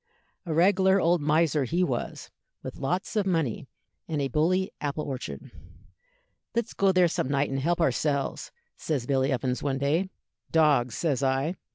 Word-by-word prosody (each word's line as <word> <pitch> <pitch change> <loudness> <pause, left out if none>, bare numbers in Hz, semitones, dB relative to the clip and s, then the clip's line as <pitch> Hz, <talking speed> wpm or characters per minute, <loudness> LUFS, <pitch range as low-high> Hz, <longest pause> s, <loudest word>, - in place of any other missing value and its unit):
A - - -2
reg'lar 190 +3 +4
old 170 -1 +2
miser 150 0 +2
he 175 +9 0
was, 130 -8 -3 0.3
with - - -7
lots 180 +10 -2
of 205 -2 +1
money, 160 - -1 0.4
and 155 -2 -2
a 140 -1 -1
bully 180 +8 +1
apple 150 +1 -2
orchard. 135 -2 -6 1.0
'Let's 235 0 -1
go 195 -1 +3
there 180 -1 +4
some 160 - -2
night 140 0 0
and 135 - -1
help 170 +5 0
ourselves,' 140 -1 0 0.2
says 140 -7 -2
Billy 135 +1 +1
Evans, 130 -1 -1
one 135 -2 -1
day. 155 +8 0 0.4
'Dogs,' 145 -7 +3
says 145 -6 0
I. 135 +4 +1
150 Hz, 160 wpm, -27 LUFS, 135-175 Hz, 1.0 s, reg'lar